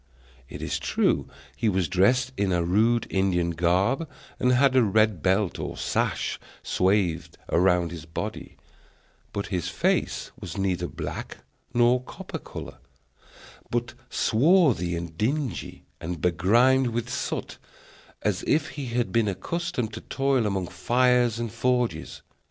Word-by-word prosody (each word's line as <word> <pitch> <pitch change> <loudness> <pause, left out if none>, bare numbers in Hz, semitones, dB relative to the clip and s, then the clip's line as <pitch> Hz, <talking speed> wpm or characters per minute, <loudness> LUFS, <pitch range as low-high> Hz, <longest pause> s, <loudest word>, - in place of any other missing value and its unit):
It - - -7
is - - -2
true - - +1 0.3
he 115 - +1
was 95 -3 +1
dressed 120 +8 +3
in 100 -1 0
a 85 -1 +2
rude 110 +7 +2
Indian 90 -3 +1
garb, 95 - +1 0.3
and 125 - +3
had 130 +1 +4
a 130 - +6
red 110 -4 +2
belt 95 0 +1
or - - -5
sash - - -1 0.2
swathed 95 -3 +1
round 90 -1 +3
his 80 -3 -8
body; 80 - -6 0.7
but 100 - -3
his 90 -4 -1
face - - 0
was - - -7
neither 90 -3 0
black - - -6 0.3
nor 120 +1 +4
copper - - -7
color, - - -9 0.9
but 120 0 -2 0.2
swarthy 125 - +3
and 85 -1 -6
dingy, 135 +3 -2
and 85 0 -5
begrimed 115 - +3
with 120 0 -2
soot, 125 - -4 0.6
as - - 0
if 150 0 +2
he 140 -3 -6
had 120 0 -1
been 115 -2 +2
accustomed 125 - -3
to 110 - -6
toil 135 -4 +1
among 95 -2 -1
fires 120 +5 +2
and 115 -2 -3
forges. 125 0 -1
110 Hz, 135 wpm, -26 LUFS, 90-125 Hz, 0.9 s, a